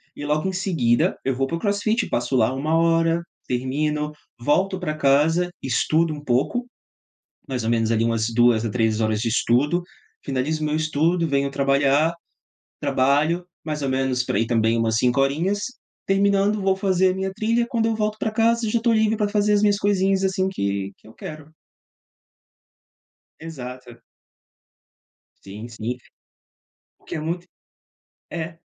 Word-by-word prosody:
e 145 - -7
logo 155 +5 0
em 190 - -2
seguida 155 -11 +1
eu 135 -2 0
vou 135 +1 0
pro 165 - -2
crossfit. 215 +3 0
Passo 120 +2 -1
lá 120 +1 +3
1 155 +4 0
hora, 165 0 +2 0.3
termino, 150 +4 -1 0.3
volto 185 +9 +1
pra 155 -4 -2
casa, 155 +5 +3
estudo 155 +5 +1
um 145 -1 -9
pouco, 150 - 0 0.8
mais 125 -4 -3
ou 115 - 0
menos 115 -1 +1
ali 115 0 +2
umas 115 -1 +1
2 120 -1 +4
a 110 - -1
3 110 -1 0
horas 110 -1 +1
de 115 - 0
estudo, 140 +9 +2 0.4
finalizo 145 +4 -1
meu 150 0 0
estudo, 160 +2 +1
venho 140 0 +1
trabalhar. 140 +3 +2 0.7
Trabalho 145 +7 +1 0.2
mais 150 -2 -4
ou 135 - -1
menos 130 -1 0
por - - -2
aí 115 +2 +1
também 115 -1 +2
umas 115 -1 +1
5 125 +3 +2
horinhas. 165 +9 +1 0.5
Terminando 200 +1 +2
vou 190 0 +3
fazer 190 -1 +2
a - - -5
minha 190 0 -2
trilha, 230 +3 +1
quando 230 -3 0
eu 225 - +1
volto 215 0 -1
pra 220 - -1
casa 230 0 +2
já 235 - +2
estou 230 0 +2
livre 220 0 +2
pra 210 - +1
fazer 210 0 +1
as 205 - +4
minhas 205 -1 +3
coisinhas, 195 -1 +1
assim, 190 0 +1
que 100 - -2
que - - -23
eu 110 - -14
quero. 155 0 -9 1.9
Exato. 125 -6 -9 1.4
Sim, 105 +4 -8
sim. 115 +2 -5 1.0
Porque - - -9
é - - -3
muito 170 +3 -4 0.8
É. 165 0 -5
155 Hz, 160 wpm, -23 LUFS, 125-190 Hz, 1.9 s, 2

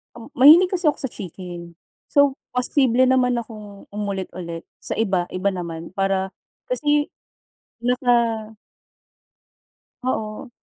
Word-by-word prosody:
Mm, 235 +4 -11
mahilig 320 +8 +8
kasi 365 -2 -1
ako 295 - +3
sa 265 - -2
chicken, 175 -3 -8 0.3
so, 285 -1 +3 0.2
posible 250 0 +3
naman 255 -1 +3
akong 210 -3 -8
umulit-ulit 185 -5 -5 0.2
sa - - -4
iba, 195 -5 +1
iba 185 +2 +1
naman, 170 -3 -6
para 195 0 0 0.4
kasi 295 -11 +1 0.7
naka. 235 -3 +1 1.5
Oo. 220 0 -3
220 Hz, 105 wpm, -22 LUFS, 190-255 Hz, 1.5 s, mahilig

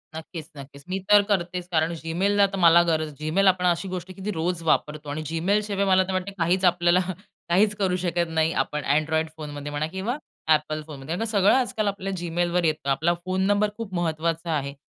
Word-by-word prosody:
नक्कीच, 160 0 -8
नक्कीच. 140 0 -11
मी 190 +1 -1
तर 205 0 +8
करतेच. 180 -2 -1
कारण 160 0 +1
Gmailला 195 +5 +2
तर - - -2
मला 170 -1 +7
गरज, 155 -2 -1
Gmail 170 +6 +2
आपण 185 -1 +3
अशी 175 +2 +1
गोष्ट 185 0 -5
आहे, - - -8
की 190 - -8
ती 210 - -1
रोज 170 +1 -1
वापरतो 150 -2 0
आणि 145 +2 -3
Gmail 185 +6 +1
शिवाय 200 -1 -1
मला 190 -1 +4
तर 190 - -2
वाटतं 185 +1 -2
काहीच 180 +3 +2
आपल्याला 175 0 +4 0.5
काहीच 205 +4 +3
करू 190 -3 0
शकत 170 -1 0
नाही 160 0 +1
आपण 150 -1 -5
अँड्रॉइड 155 +3 +1
फोनमध्ये 145 -1 -6
म्हणा 145 +1 -2
किंवा 190 - -3 0.3
Apple 155 0 +1
फोनमध्ये. 150 +1 -6
कारण 225 +5 -2
सगळं 205 -2 +3
आजकाल 235 -5 0
आपल्या 195 -1 -3
Gmailवर 175 +1 0
येतं. 155 -3 -1
आपला 160 +6 +2
फोन 185 0 -1
नंबर 205 +1 +2
खूप 225 -4 -6
महत्त्वाचा 165 0 -1
आहे. 140 -1 -4
175 Hz, 200 wpm, -25 LUFS, 155-190 Hz, 0.5 s, तर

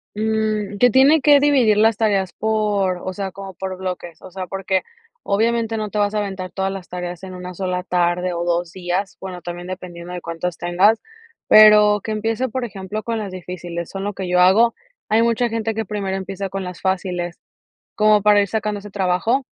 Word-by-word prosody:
Mm, 215 -1 -1
que 245 +4 +5
tiene 275 +4 +5
que 290 -1 +6
dividir 265 -7 +4
las 220 0 +4
tareas 200 -4 +1
por, 205 -4 0
o 185 - -4
sea, 195 0 -4
como 195 -1 -9
por 190 0 -5
bloques, 180 -3 -6
o - - -11
sea, 185 0 -6
porque 195 0 -1 0.4
obviamente 225 +2 +1
no 215 -1 -3
te 210 - -5
vas 205 0 +1
a 210 - 0
aventar 190 -2 -4
todas 195 0 -2
las 195 -1 -7
tareas 180 0 -6
en 185 -1 -7
una 180 0 -8
sola 180 0 -2
tarde 180 0 0
o 170 - -2
2 175 0 -1
días, 185 +2 -3
bueno, 185 -2 -7
también 175 0 -7
dependiendo 180 -1 -7
de 180 - -5
cuántos, 170 +1 -4
tengas, 185 +6 +3 0.5
pero 210 -1 +7
que 220 - -4
empiece, 225 +4 -1
por 255 +2 -3
ejemplo, 200 -1 -5
con 230 +2 -3
las 205 -3 -4
difíciles, 175 -2 -6
son 195 0 -5
lo 205 +1 -3
que 190 -2 -5
yo 180 0 +3
hago. 205 +6 +5 0.3
Hay 225 +2 +4
mucha 235 +1 +1
gente 225 0 -2
que 225 +1 -2
primero 195 -1 -3
empieza 195 0 -4
con 195 0 -4
las 180 -2 -7
fáciles, 180 -2 -2 0.6
como 215 -1 +4
para 210 0 +5
ir 200 - 0
sacando 210 -1 -2
ese 205 0 -11
trabajo, 200 +7 0
195 Hz, 200 wpm, -20 LUFS, 180-215 Hz, 0.6 s, pero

